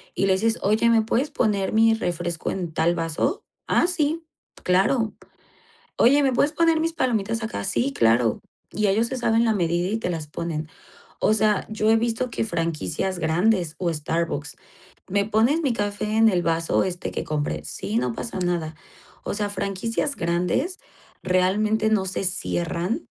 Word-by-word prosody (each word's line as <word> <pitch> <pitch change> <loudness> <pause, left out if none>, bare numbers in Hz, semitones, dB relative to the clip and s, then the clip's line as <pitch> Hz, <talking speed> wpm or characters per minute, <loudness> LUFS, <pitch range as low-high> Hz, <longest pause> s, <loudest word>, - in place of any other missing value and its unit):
y 195 - +1
les 190 0 +2
dices, 225 +1 +1
oye, 215 +3 +3
¿me 225 -1 +4
puedes 255 +7 0
poner 210 -7 0
mi 225 0 +5
refresco 175 -5 -2
en 175 -4 -4
tal 170 +2 +2
vaso? 165 - -1 0.2
Ah, - - +3
sí, 325 -1 0 0.4
claro. 210 +5 +2 0.8
Oye, 280 +5 +5
¿me 265 - +2
puedes 285 +4 +2
poner 330 0 +2
mis 330 - 0
palomitas 230 -5 0
acá? 220 - -4
Sí, 120 +6 0
claro. 115 0 +2 0.3
Y 210 -1 0
ellos 220 +4 +2
se 260 - -4
saben 230 -1 +2
la 225 - +3
medida 175 -2 0
y 215 - -1
te 225 - -3
las 160 -4 -4
ponen. 155 0 -4 0.5
O - - +3
sea, 215 -1 +2
yo 215 0 +1
he 225 - +5
visto 235 +2 -1
que - - -1
franquicias 165 - -2
grandes 170 +1 +1
o 175 -2 0
Starbucks 150 -1 -2 0.6
me 200 +1 +1
pones 230 +10 +2
mi 270 -6 +1
café 205 0 -2
en 225 0 +6
el 180 -3 +1
vaso 165 0 +1
este 180 -1 -4
que - - -3
compré. 145 - -2
Sí, 105 - -3
no 125 0 0
pasa 210 - -5
nada. 175 -3 -1 0.5
O - - -2
sea, 205 -1 -1
franquicias 225 +8 -2
grandes 180 - -1 0.4
realmente 210 +4 +2
no 210 -3 +2
se 190 +1 -2
cierran 180 - -2
200 Hz, 170 wpm, -24 LUFS, 170-225 Hz, 0.8 s, en